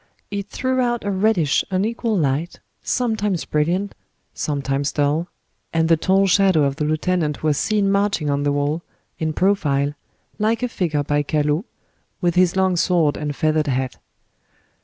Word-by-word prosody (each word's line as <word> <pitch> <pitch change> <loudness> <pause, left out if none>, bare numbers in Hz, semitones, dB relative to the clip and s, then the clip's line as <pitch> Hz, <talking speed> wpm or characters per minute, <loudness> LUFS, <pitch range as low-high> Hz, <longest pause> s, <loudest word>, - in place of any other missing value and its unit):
It 200 -1 -3
threw 260 -1 -1
out 240 -1 0
a 200 - -1
reddish, 190 -7 +2
unequal 215 +3 0
light, 150 +2 -1 0.2
sometimes 215 -7 -1
brilliant, 175 +7 0 0.4
sometimes 140 -1 -1
dull, 150 +3 0 0.5
and 160 0 +2
the 165 - +6
tall 190 +4 +2
shadow 190 -4 +4
of 140 0 0
the 150 - -1
lieutenant 155 0 -1
was 150 -2 +2
seen 205 -2 +1
marching 200 -5 +1
on 140 0 0
the 145 0 +1
wall, 145 +3 -1 0.4
in 160 -1 0
profile, 150 -6 +1 0.5
like 225 +3 +1
a - - +2
figure 155 -9 -1
by 145 +1 +1
Callot, 150 +5 0 0.5
with 175 -2 +1
his 180 +1 +3
long 190 -1 +2
sword 165 -4 +2
and 150 -2 -4
feathered 155 0 +1
hat. 130 -1 -1
165 Hz, 155 wpm, -21 LUFS, 150-195 Hz, 0.5 s, the